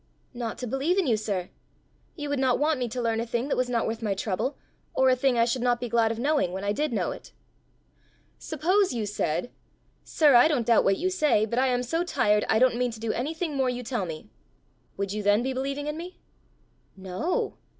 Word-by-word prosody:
"Not 240 Hz, -2 st, -4 dB
to 250 Hz, -, -5 dB
believe 270 Hz, -, 0 dB
in 385 Hz, -, +2 dB
you, 240 Hz, -5 st, +3 dB
sir. 200 Hz, -4 st, -3 dB, 0.6 s
You 295 Hz, -3 st, -5 dB
would 285 Hz, -1 st, -1 dB
not 260 Hz, -2 st, +2 dB
want 300 Hz, -1 st, +1 dB
me 245 Hz, -, -1 dB
to 250 Hz, -, -5 dB
learn 230 Hz, -2 st, 0 dB
a 230 Hz, -, -1 dB
thing 235 Hz, +4 st, -2 dB
that -, -, +1 dB
was 255 Hz, -1 st, 0 dB
not 235 Hz, -2 st, 0 dB
worth 225 Hz, +1 st, -3 dB
my 205 Hz, -3 st, -1 dB
trouble, 200 Hz, +7 st, -2 dB, 0.4 s
or 265 Hz, 0 st, +4 dB
a -, -, +4 dB
thing 255 Hz, -1 st, +1 dB
I 230 Hz, -, +4 dB
should 245 Hz, +1 st, -1 dB
not 245 Hz, -1 st, +2 dB
be 245 Hz, -, -3 dB
glad 225 Hz, -1 st, +2 dB
of 225 Hz, -, -4 dB
knowing 280 Hz, -, +1 dB
when 190 Hz, +1 st, -4 dB
I 200 Hz, -, 0 dB
did 295 Hz, +7 st, -1 dB
know 230 Hz, -, -1 dB
it." -, -, -10 dB, 1.1 s
"Suppose 360 Hz, +3 st, +1 dB
you 225 Hz, -3 st, -1 dB
said, 200 Hz, 0 st, -2 dB, 0.5 s
'Sir, 300 Hz, -3 st, +3 dB
I 240 Hz, +4 st, +7 dB
don't 280 Hz, -7 st, 0 dB
doubt 230 Hz, 0 st, +4 dB
what 195 Hz, -, +3 dB
you 370 Hz, +2 st, -1 dB
say, 300 Hz, -, +2 dB
but 235 Hz, +3 st, -1 dB
I 265 Hz, -, +3 dB
am 250 Hz, -1 st, +1 dB
so 325 Hz, +8 st, -1 dB
tired, 210 Hz, -11 st, +2 dB
I 220 Hz, -, +4 dB
don't 250 Hz, 0 st, +3 dB
mean 250 Hz, 0 st, +1 dB
to 225 Hz, -2 st, -9 dB
do 225 Hz, 0 st, -1 dB
anything 315 Hz, +4 st, -3 dB
more 265 Hz, -2 st, +1 dB
you 250 Hz, 0 st, -4 dB
tell 230 Hz, -6 st, -2 dB
me,' 160 Hz, +6 st, -8 dB, 0.7 s
would 200 Hz, 0 st, -2 dB
you 210 Hz, -, -2 dB
then 205 Hz, +3 st, +3 dB
be 265 Hz, +1 st, -1 dB
believing 275 Hz, +2 st, -3 dB
in 300 Hz, +1 st, -3 dB
me?" 355 Hz, +2 st, -8 dB, 0.8 s
"No. 190 Hz, -, -2 dB
245 Hz, 235 wpm, -26 LUFS, 220-285 Hz, 1.1 s, I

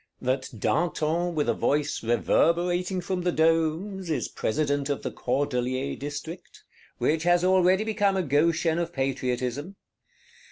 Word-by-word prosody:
That 130 Hz, +1 st, -1 dB
Danton, 170 Hz, -, 0 dB
with 150 Hz, -, 0 dB
a -, -, +3 dB
"voice 145 Hz, 0 st, 0 dB
reverberating 175 Hz, -, +1 dB
from 180 Hz, +1 st, -2 dB
the 180 Hz, 0 st, +1 dB
domes," 165 Hz, +4 st, +1 dB
is 155 Hz, -, -1 dB
President 145 Hz, +2 st, -1 dB
of 140 Hz, -, -2 dB
the -, -, -3 dB
Cordeliers 130 Hz, 0 st, -2 dB
District; 145 Hz, +5 st, -7 dB, 0.3 s
which 155 Hz, +1 st, +1 dB
has 175 Hz, +1 st, +3 dB
already 185 Hz, +1 st, +4 dB
become 205 Hz, -3 st, +1 dB
a 185 Hz, -, +1 dB
Goshen 165 Hz, +3 st, +2 dB
of 170 Hz, 0 st, -3 dB
Patriotism. 135 Hz, +4 st, -2 dB
160 Hz, 130 wpm, -26 LUFS, 140-175 Hz, 0.3 s, already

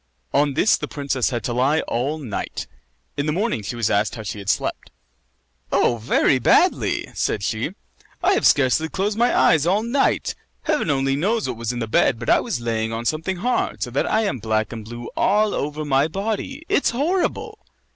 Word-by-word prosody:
On 140 Hz, -1 st, +2 dB
this 205 Hz, -, +4 dB
the 150 Hz, -, -5 dB
princess 140 Hz, -4 st, -1 dB
had 120 Hz, -2 st, -3 dB
to 120 Hz, -, -2 dB
lie 135 Hz, +6 st, +2 dB
all 135 Hz, +6 st, -2 dB
night. 125 Hz, -10 st, -5 dB, 0.5 s
In 145 Hz, +1 st, -1 dB
the -, -, +2 dB
morning 200 Hz, -, -1 dB
she 100 Hz, +4 st, -5 dB
was 115 Hz, -3 st, 0 dB
asked 105 Hz, +1 st, +1 dB
how 110 Hz, -, -7 dB
she 105 Hz, 0 st, -5 dB
had 100 Hz, 0 st, -5 dB
slept. -, -, -1 dB, 0.8 s
"Oh, 120 Hz, -, +2 dB
very 125 Hz, +3 st, +2 dB
badly!" -, -, +2 dB
said 100 Hz, -, -1 dB
she. 110 Hz, -, -2 dB, 0.5 s
"I 380 Hz, +3 st, +4 dB
have -, -, +3 dB
scarcely 145 Hz, +3 st, +3 dB
closed 200 Hz, +4 st, -1 dB
my 240 Hz, +2 st, +3 dB
eyes 160 Hz, -1 st, +4 dB
all 200 Hz, +4 st, +2 dB
night. 250 Hz, +4 st, +1 dB, 0.3 s
Heaven 295 Hz, -, 0 dB
only 135 Hz, -1 st, +1 dB
knows 210 Hz, -, 0 dB
what 125 Hz, -, -3 dB
was 115 Hz, 0 st, -3 dB
in 125 Hz, -, -5 dB
the 120 Hz, -, -2 dB
bed, 115 Hz, +2 st, +2 dB
but 115 Hz, -, -1 dB
I -, -, +5 dB
was -, -, -3 dB
lying 115 Hz, -1 st, -2 dB
on 115 Hz, +1 st, -4 dB
something 160 Hz, +7 st, -1 dB
hard, 245 Hz, +7 st, -1 dB
so -, -, -4 dB
that -, -, 0 dB
I 220 Hz, -, +3 dB
am 140 Hz, -, -1 dB
black 110 Hz, +1 st, -1 dB
and 115 Hz, -2 st, -7 dB
blue 120 Hz, +2 st, -8 dB
all 210 Hz, +1 st, +2 dB
over 150 Hz, +1 st, -3 dB
my 140 Hz, +1 st, +2 dB
body. 220 Hz, -, -4 dB
It's -, -, +2 dB
horrible!" 365 Hz, -, -1 dB
140 Hz, 200 wpm, -22 LUFS, -, 0.8 s, I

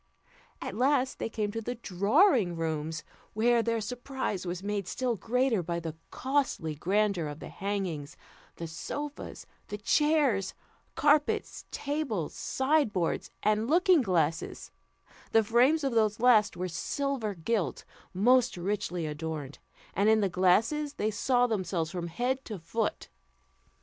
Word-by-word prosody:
At -, -, -4 dB
last 260 Hz, +3 st, +1 dB
they -, -, -2 dB
came 210 Hz, -2 st, -2 dB
to 225 Hz, +1 st, -4 dB
the 245 Hz, +3 st, -4 dB
drawing 220 Hz, -, +3 dB
rooms, 160 Hz, -1 st, -3 dB, 0.3 s
where 235 Hz, +2 st, +3 dB
their 230 Hz, 0 st, 0 dB
surprise 245 Hz, -4 st, -4 dB
was 175 Hz, +2 st, -4 dB
made 200 Hz, -2 st, -2 dB
still 250 Hz, -2 st, -1 dB
greater 240 Hz, 0 st, +1 dB
by 170 Hz, 0 st, -2 dB
the 165 Hz, -2 st, -5 dB
costly 260 Hz, -, -1 dB
grandeur 190 Hz, +1 st, +1 dB
of 145 Hz, 0 st, -6 dB
the -, -, -8 dB
hangings, 190 Hz, -8 st, -4 dB, 0.4 s
the 170 Hz, -, -6 dB
sofas, 285 Hz, -, -6 dB, 0.2 s
the 205 Hz, -, -5 dB
chairs, 270 Hz, -5 st, +2 dB, 0.4 s
carpets, 295 Hz, 0 st, +2 dB
tables, 280 Hz, -, -2 dB
sideboards, 265 Hz, -, 0 dB
and 215 Hz, +3 st, +2 dB
looking 355 Hz, 0 st, +5 dB
glasses; 165 Hz, -, -1 dB, 0.6 s
the 225 Hz, -, +6 dB
frames 250 Hz, +8 st, +3 dB
of 270 Hz, -3 st, 0 dB
these 215 Hz, -1 st, +2 dB
last 225 Hz, -5 st, +4 dB
were 180 Hz, +1 st, -2 dB
silver 220 Hz, -, -2 dB
gilt, 180 Hz, -, -2 dB, 0.3 s
most 245 Hz, +4 st, +3 dB
richly 180 Hz, -2 st, -2 dB
adorned, 150 Hz, -2 st, -5 dB, 0.3 s
and 200 Hz, +2 st, +3 dB
in 220 Hz, 0 st, +5 dB
the 200 Hz, -2 st, +1 dB
glasses 225 Hz, -, +2 dB
they 215 Hz, +1 st, 0 dB
saw 245 Hz, +3 st, +2 dB
themselves 180 Hz, -7 st, -1 dB
from 175 Hz, -2 st, -4 dB
head 250 Hz, +9 st, -1 dB
to 215 Hz, -, -5 dB
foot. 210 Hz, +6 st, -2 dB
210 Hz, 135 wpm, -29 LUFS, 175-255 Hz, 0.6 s, the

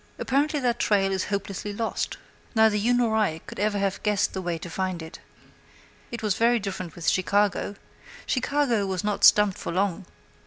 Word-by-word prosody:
Apparently 290 Hz, +3 st, 0 dB
that 240 Hz, -3 st, 0 dB
trail 195 Hz, -2 st, +2 dB
is 190 Hz, -1 st, -1 dB
hopelessly 200 Hz, 0 st, -4 dB
lost. 225 Hz, +2 st, -3 dB, 0.4 s
Neither 220 Hz, -1 st, +5 dB
you 215 Hz, +4 st, +1 dB
nor 240 Hz, -3 st, +2 dB
I 205 Hz, -8 st, +1 dB
could -, -, -9 dB
ever 205 Hz, 0 st, +1 dB
have 195 Hz, -1 st, -1 dB
guessed 210 Hz, -2 st, +1 dB
out -, -, -21 dB
the 190 Hz, -, -3 dB
way 175 Hz, -2 st, -2 dB
to 165 Hz, -, -8 dB
find 185 Hz, 0 st, -3 dB
it. 160 Hz, -, -10 dB, 0.9 s
It 235 Hz, -1 st, -6 dB
was 210 Hz, -2 st, +2 dB
very 235 Hz, +4 st, +3 dB
different 190 Hz, -5 st, -5 dB
with 170 Hz, -, -6 dB
Chicago. 200 Hz, +2 st, +1 dB, 0.5 s
Chicago 255 Hz, -6 st, +1 dB
was 190 Hz, -2 st, -2 dB
not 205 Hz, -1 st, -2 dB
stumped 210 Hz, -2 st, +6 dB
for -, -, -4 dB
long. 185 Hz, 0 st, -1 dB
205 Hz, 185 wpm, -25 LUFS, 190-225 Hz, 0.9 s, stumped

